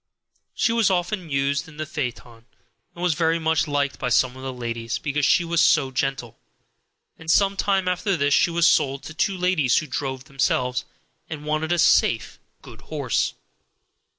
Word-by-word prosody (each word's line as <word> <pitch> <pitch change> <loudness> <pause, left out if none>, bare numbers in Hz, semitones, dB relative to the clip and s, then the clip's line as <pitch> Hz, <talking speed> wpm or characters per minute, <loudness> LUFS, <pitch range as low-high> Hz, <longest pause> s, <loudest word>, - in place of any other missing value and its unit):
She - - +1
was 230 -3 +3
often 180 -1 -2
used 140 +1 0
in 155 -1 -14
the 155 - -3
phaeton, 125 -5 -6 0.5
and 175 - -7
was 180 -2 +2
very 165 +1 +1
much 160 0 +1
liked 145 -1 -1
by 125 - -2
some 125 +1 +2
of 130 - -10
the 135 0 -4
ladies, 115 -1 -4
because 145 -1 -1
she 175 - +3
was 170 0 +1
so 150 -6 +3
gentle; 130 -3 -3 0.8
and 160 0 -9
some 195 +4 +3
time 195 -1 0
after 180 +1 0
this 145 -1 +1
she - - +4
was 170 0 +1
sold 140 -4 +2
to 155 - -8
two 190 +5 -1
ladies 180 -9 +2
who - - 0
drove 130 -3 -4
themselves, 130 -2 -1 0.4
and 150 -2 -7
wanted 155 +2 -1
a 175 - +2
safe, 120 -8 +2 0.2
good - - -13
horse. - - -2
150 Hz, 180 wpm, -23 LUFS, 135-170 Hz, 0.8 s, she